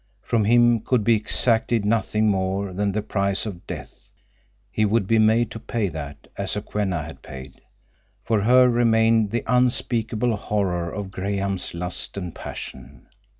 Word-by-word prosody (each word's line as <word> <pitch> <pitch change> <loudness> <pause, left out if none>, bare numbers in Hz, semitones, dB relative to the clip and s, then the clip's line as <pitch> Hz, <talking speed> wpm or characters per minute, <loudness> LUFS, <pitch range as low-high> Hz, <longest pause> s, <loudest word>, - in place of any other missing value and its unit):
From 110 -3 +1
him 120 +1 +4
could 115 +1 0
be 115 +1 +4
exacted 115 0 +2
nothing 110 0 +1
more 95 -1 -1
than 100 +2 0
the 105 +1 -2
price 100 -1 -1
of 95 -5 -8
death; - - -9 0.6
he 110 - 0
would 105 0 +2
be 115 +3 +2
made 110 +2 +3
to 115 - -7
pay 115 -3 -2
that, 75 -3 -8
as - - -3
Sokwenna 100 -5 -2
had 80 +2 -10
paid. 65 +1 -11 0.6
For 110 -3 +1
her 125 +4 +5
remained 115 -2 +3
the 120 +3 -2
unspeakable 120 -2 +1
horror 90 -5 -2
of 100 -1 -6
Graham's 100 -1 -3
lust 90 +3 -3
and 90 -4 -5
passion. 65 - -9
105 Hz, 150 wpm, -23 LUFS, 95-115 Hz, 0.6 s, her